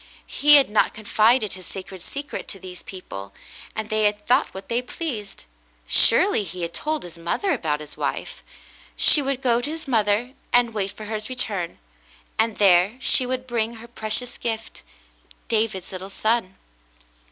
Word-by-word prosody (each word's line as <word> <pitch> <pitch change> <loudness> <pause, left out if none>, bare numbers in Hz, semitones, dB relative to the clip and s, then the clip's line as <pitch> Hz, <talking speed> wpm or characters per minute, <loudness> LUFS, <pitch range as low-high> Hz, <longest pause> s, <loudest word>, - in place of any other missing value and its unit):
He 295 0 +5
had 280 -2 +7
not 210 0 +2
confided 215 +1 +3
his 185 -2 -7
sacred 190 -1 -7
secret 285 - -6
to 195 - -8
these 180 -1 -10
people, 100 - -9 0.4
and 220 -1 -3
they 215 0 +2
had 205 0 0
thought 255 +3 +3
what 190 0 -9
they 235 +1 0
pleased. 250 - -6 0.4
Surely 205 - +4
he 180 -1 -6
had 170 0 -4
told 310 0 -2
his 170 -1 -10
mother 270 - -1
about 150 -2 -1
his 150 -1 -9
wife. - - -3 0.5
She 300 - +6
would 275 -1 -2
go 240 -2 +3
to 285 - -3
his 320 -1 -6
mother 225 +1 +1 0.2
and 240 -1 +4
wait 200 -2 -2
for 215 +1 -10
his 215 +1 -4
return, 210 -9 -3 0.6
and 225 -1 +2
there 195 +3 +5
she 255 0 +3
would 255 0 -2
bring 235 -2 -1
her 230 +1 -11
precious 240 +1 -2
gift 225 -2 -4 0.3
— - - -26
David's 215 -5 -1
little 190 +1 -6
son. 215 -2 -1
215 Hz, 170 wpm, -23 LUFS, 190-245 Hz, 0.6 s, had